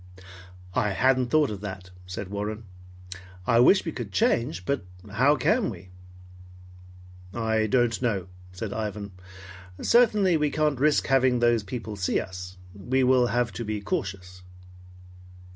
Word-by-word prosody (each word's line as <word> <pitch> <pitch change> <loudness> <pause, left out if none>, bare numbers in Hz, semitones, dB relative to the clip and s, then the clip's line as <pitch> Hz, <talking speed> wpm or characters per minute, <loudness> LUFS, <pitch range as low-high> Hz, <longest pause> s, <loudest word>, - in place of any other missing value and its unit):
"I 105 -4 +1
hadn't 130 +3 +2
thought 150 -1 +2
of 100 -2 -6
that," 95 -3 -7 0.2
said 90 +1 -6
Warren. 105 +2 -4 0.8
"I 115 -1 +3
wish 190 +12 +5
we 165 - -2
could 120 -8 -6
change, 95 -1 0
but 140 -1 -1 0.3
how 130 +8 +3
can 215 +7 +1
we?" 90 -3 -10 1.4
"I 110 -1 0
don't 120 0 +1
know," 105 -8 0 0.3
said 100 +3 -5
Ivan. 105 -2 -4 0.7
"Certainly 210 -7 +4
we 150 -1 +1
can't 150 -3 0
risk 150 +2 +3
having 130 -2 +3
those 120 -1 +3
people 110 +1 -6
see 95 -2 0
us. 90 0 -8 0.2
We 125 +7 0
will 125 -1 +4
have 120 -1 0
to 120 - -5
be 105 -1 -3
cautious." 95 -3 -4
115 Hz, 140 wpm, -26 LUFS, 100-130 Hz, 1.4 s, wish